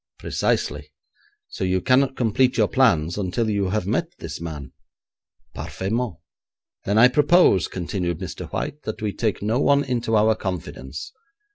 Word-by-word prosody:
'Precisely. 75 +1 -2 0.6
So - - -6
you 95 0 +1
cannot 130 +6 +2
complete 125 +2 +2
your 110 -3 +4
plans 90 -10 +2
until 105 +4 -1
you 100 -2 0
have 105 -1 -1
met 125 - 0
this 80 -1 -7
man?' 75 -5 -6 0.8
'Parfaitement.' 110 +1 -3 0.7
'Then 100 +2 +1
I 120 +3 +8
propose,' 145 - +4
continued 90 -1 -3
Mr. 90 -2 -7
White, 150 - -4
'that 110 0 -6
we 105 -2 -1
take 110 -4 -2
no 110 +4 +1
one 140 0 +3
into 120 -4 -1
our 110 +1 +4
confidence. 75 - -6
105 Hz, 145 wpm, -23 LUFS, 90-125 Hz, 0.8 s, I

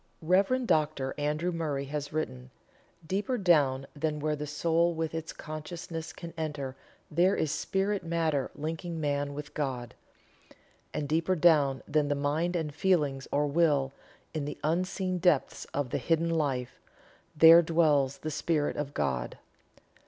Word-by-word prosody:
Rev. 200 +10 +3
Dr. 150 - +1
Andrew 150 +4 0
Murray 150 -5 -2
has 145 +1 -4
written: 130 -5 -4 0.6
"Deeper 205 +9 -1
down 145 - +3
than 150 0 -1
where 150 +1 0
the 150 0 -5
soul 165 +3 +1
with 160 0 -2
its 160 0 -4
consciousness 160 +1 -6
can 170 -2 -9
enter 145 -5 -4 0.4
there 175 +5 +3
is 155 - 0
spirit 195 +6 -1
matter 165 -5 0
linking 165 +2 -4
man 145 -1 -1
with 150 0 -7
God; 130 -5 -3 1.0
and 145 - -3
deeper 165 +5 +1
down 150 -6 +4
than 150 -1 +2
the 145 - +1
mind 150 +5 0
and 160 -4 -2
feelings 145 -6 +1
or 145 +1 +2
will 145 -3 +2 0.4
in 155 -3 -2
the 145 - -5
unseen 185 +3 0
depths 175 -6 +2
of 140 -3 -3
the - - 0
hidden 165 0 +1
life 135 -6 -1 0.6
there 165 +2 +9
dwells 150 -5 +2
the 155 - -5
Spirit 150 0 0
of 145 -1 -4
God." 65 -4 -1
155 Hz, 145 wpm, -29 LUFS, 145-170 Hz, 1.0 s, there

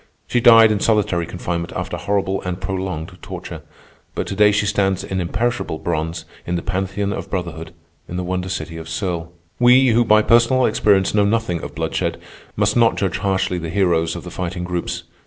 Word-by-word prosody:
She 120 - 0
died 115 -2 +8
in 105 - 0
solitary 100 -6 +1
confinement 85 -1 -4
after - - -3
horrible 100 -1 -1
and 90 0 -4
prolonged 95 -4 -4
torture; - - -8 0.5
but - - -2
to 100 - -5
day 105 +1 +5
she 105 0 +1
stands 95 -2 +1
in 95 -1 -3
imperishable 100 0 -2
bronze 80 0 -3 0.2
in 90 - -3
the 85 - -3
Pantheon 95 +2 -2
of - - -6
Brotherhood 85 -3 -4 0.4
in 90 - -5
the 90 - -2
wonder 90 +1 -3
city 85 -2 -4
of 80 0 -8
Serles. 85 -1 -3 0.3
We, 125 +2 +6
who 120 +1 +4
by 110 -1 +4
personal 120 +3 +4
experience 100 -3 +2
know 105 -1 +3
nothing 100 -5 0
of - - -8
bloodshed, - - -2 0.4
must - - +1
not 115 -1 +4
judge 95 -2 -1
harshly 95 -2 0
the 85 -1 -5
heroes 85 -3 +1
of 85 - -7
the 90 - -8
Fighting 90 0 -4
Groups. 90 -1 -3
95 Hz, 190 wpm, -20 LUFS, 85-105 Hz, 0.5 s, died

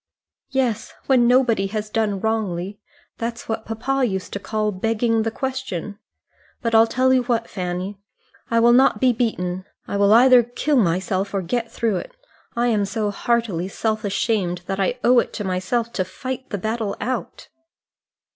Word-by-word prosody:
"Yes, 245 -5 -1
when 250 -3 +4
nobody 240 -6 +3
has 210 +1 -4
done 210 -3 0
wrongly. 205 -3 -2 0.4
That's 230 0 -4
what 220 -1 -3
papa 260 +5 -1
used 190 -6 -2
to 200 - -3
call 215 +1 -1
begging 225 +3 +1
the 225 - 0
question. 225 -6 -4 0.6
But 230 -2 -2
I'll 225 0 +6
tell 260 +2 +2
you 255 - +4
what, 235 -2 0
Fanny; 185 +2 -4 0.5
I 230 - +3
will 240 +1 +6
not 260 +2 +4
be 255 -1 +4
beaten. 185 -6 -2 0.2
I 200 - -2
will 200 0 +4
either 250 +2 +7
kill 245 +5 -1
myself 190 0 0
or 195 - 0
get 230 +6 -2
through 225 -5 0
it. - - -7 0.4
I 235 +1 +1
am 220 -4 +2
so 210 +1 -2
heartily 210 -5 0
self 215 +2 -2
ashamed 195 -4 -1
that 195 +1 -3
I 195 +6 +1
owe 245 0 +6
it - - -2
to 210 - -4
myself 195 +6 -1
to 185 - 0
fight 255 +8 -6
the 205 - -2
battle 220 +1 -2
out." 255 +1 -4
225 Hz, 170 wpm, -22 LUFS, 195-240 Hz, 0.6 s, either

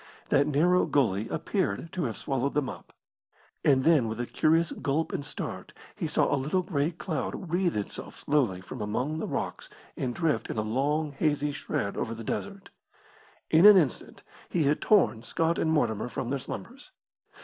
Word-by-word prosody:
That 140 +1 +3
narrow 170 +5 +3
gully 115 -6 +1
appeared 165 0 -2
to 180 -5 -1
have 115 -4 -3
swallowed 135 +1 -1
them 145 -3 +1
up. - - -9 0.7
And 135 -2 +4
then 155 -7 +4
with 110 +1 -4
a 120 - -1
curious 165 +5 +2
gulp 155 +2 -1
and - - -2
start 145 - -6 0.2
he - - -3
saw - - +2
a - - +4
little 170 +7 0
grey 155 -4 0
cloud 165 0 -4
wreathe 175 - +1
itself 105 - -5
slowly 125 -11 +1
from 115 +5 -8
among 125 +9 -2
the - - -3
rocks - - -4 0.3
and 125 -2 -3
drift 160 -9 0
in - - -4
a 110 - +1
long, 145 +7 0
hazy 145 0 0
shred 100 -7 -3
over 115 - -2
the 115 - -8
desert. 195 - -5 0.8
In 165 +5 +8
an 210 -2 +10
instant 150 -9 -1 0.3
he 170 - +1
had 145 +1 +1
torn 190 - +3
Scott 165 +7 0
and 160 - +1
Mortimer 120 -7 0
from 120 +2 -4
their 140 - 0
slumbers. 270 - -8
145 Hz, 180 wpm, -28 LUFS, 125-165 Hz, 0.8 s, an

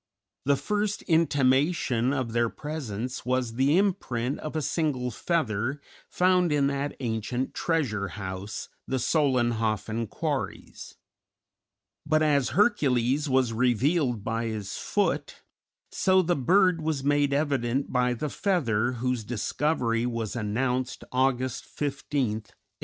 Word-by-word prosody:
The 140 +1 +4
first 205 +6 -1
intimation 140 -5 +2
of 130 -5 -1
their 115 0 +1
presence 130 -6 -5
was 125 -2 0
the 135 +7 +3
imprint 135 - 0
of 155 0 -6
a 155 - 0
single 135 -6 -1
feather 130 - -1 0.3
found 180 -2 +3
in 145 -2 +3
that 140 +1 -1
ancient 120 +1 -2
treasure 125 - 0
house, 95 +2 -6 0.2
the 130 - 0
Solenhofen 115 - +1
quarries; - - -4 1.1
but 155 +1 +2
as 145 -4 +2
Hercules 140 - +2
was 130 -3 +2
revealed 125 - +1
by 115 +2 -2
his 105 -3 -4
foot, - - -1 0.5
so 185 0 +3
the 175 +1 +1
bird 180 +5 +3
was 155 -3 -1
made 145 0 +2
evident 140 -3 0
by 125 -1 +2
the 150 +5 -3
feather 125 - +1
whose 125 -1 -1
discovery 120 +1 0
was 115 -3 -3
announced 125 +4 -1
August 130 -1 0
15, 145 - -2
1861. 115 -7 -3
130 Hz, 120 wpm, -27 LUFS, 115-150 Hz, 1.1 s, The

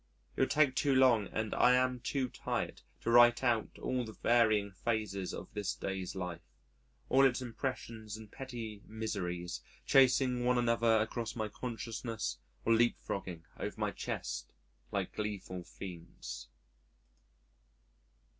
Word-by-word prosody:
It - - -7
would 130 - +3
take 145 -3 +4
too 140 0 +2
long 125 -6 +5
and 110 -1 -2
I 125 - +5
am 125 0 +2
too 130 +1 -1
tired - - -3 0.2
to 115 - 0
write 120 +1 +7
out 115 -3 +1
all 130 -1 -1
the 110 -2 -7
varying 110 -4 +3
phases 100 -1 -2
of - - -8
this 105 -2 -2
day's 95 -1 -4
life 90 -2 -4 0.7
all 135 +1 +5
its 130 -2 +4
impressions 115 -3 -4
and 110 -1 -12
petty 115 -6 -6
miseries 90 - -3 0.2
chasing 130 -1 +4
one 125 0 +3
another 115 -1 +3
across 115 +2 -2
my 110 -2 -2
consciousness 115 -1 -4 0.3
or 115 - +5
leap 120 +1 +4
frogging 90 -3 -5
over - - -4
my - - 0
chest - - -4 0.4
like - - -2
gleeful 100 -4 -4
fiends. 85 -10 -8
115 Hz, 135 wpm, -33 LUFS, 100-125 Hz, 0.7 s, write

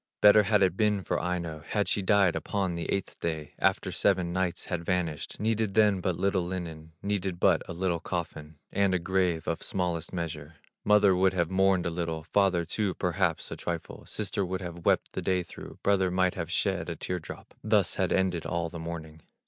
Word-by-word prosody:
Better 105 +1 +8
had 105 0 +3
it 90 -2 +2
been 105 -2 +1
for - - -1
Aino, 85 -3 -3
Had 105 +5 -1
she 105 - +1
died 100 -3 +3
upon 95 +3 -1
the 85 -1 -3
eighth 100 - -3
day 80 -3 -3
After - - +1
seven 90 -3 +1
nights 95 -1 -1
had 85 -1 -3
vanished; 85 -5 -2
Needed 110 -2 0
then 105 -3 +4
but 90 -2 -1
little 100 -1 +1
linen, 80 -3 -6
Needed 95 -3 -2
but - - +4
a - - -3
little 85 -1 -1
coffin, 80 -3 -5 0.2
And 100 -1 +2
a - - +4
grave 90 -2 0
of - - -1
smallest 85 -3 -2
measure; 80 -3 -5 0.3
Mother 105 -2 +5
would 95 +1 +3
have 85 -1 0
mourned 95 -1 +3
a 85 - 0
little, 80 -2 -3
Father 90 0 +2
too 95 +1 -1
perhaps - - 0
a - - -3
trifle, 85 -1 -5
Sister 100 -1 -1
would 95 +1 -3
have 85 -2 -6
wept - - +2
the - - -3
day 90 -1 +1
through, - - -11
Brother 95 -2 +3
might 90 0 +2
have 85 -1 -5
shed 95 -1 0
a 85 - -3
tear 90 +3 -3
drop, 80 - -10
Thus - - +3
had - - 0
ended 90 -3 +1
all 85 -1 -2
the 85 - -7
mourning." 80 -1 -7
90 Hz, 200 wpm, -28 LUFS, 85-95 Hz, 0.3 s, Better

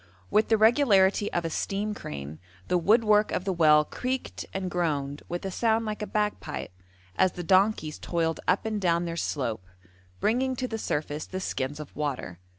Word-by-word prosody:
With 215 - +3
the 220 - +4
regularity 210 -4 +4
of 175 -1 -1
a 165 - -2
steam 205 +5 -2
crane 75 - -7 0.3
the 180 - +3
woodwork 215 +2 +4
of 180 - -2
the 195 - 0
well 150 -3 +5
creaked 255 - -4
and 185 -1 -3
groaned 145 -5 -1
with 175 +2 -4
a 190 - -2
sound 225 +3 +1
like 215 0 -4
a 210 - -3
bagpipe, 210 - -2 0.5
as 185 - +3
the 175 - -5
donkeys 185 -3 +2
toiled 165 -2 -1
up 200 - +2
and 215 -2 -2
down 170 -1 +2
their 165 -1 -3
slope, 115 - -3 0.5
bringing 255 - +1
to 255 0 -2
the 225 -2 -4
surface 150 -4 -3
the 185 - -4
skins 145 -5 -3
of 150 - -9
water. 135 - -3
185 Hz, 180 wpm, -27 LUFS, 150-215 Hz, 0.5 s, well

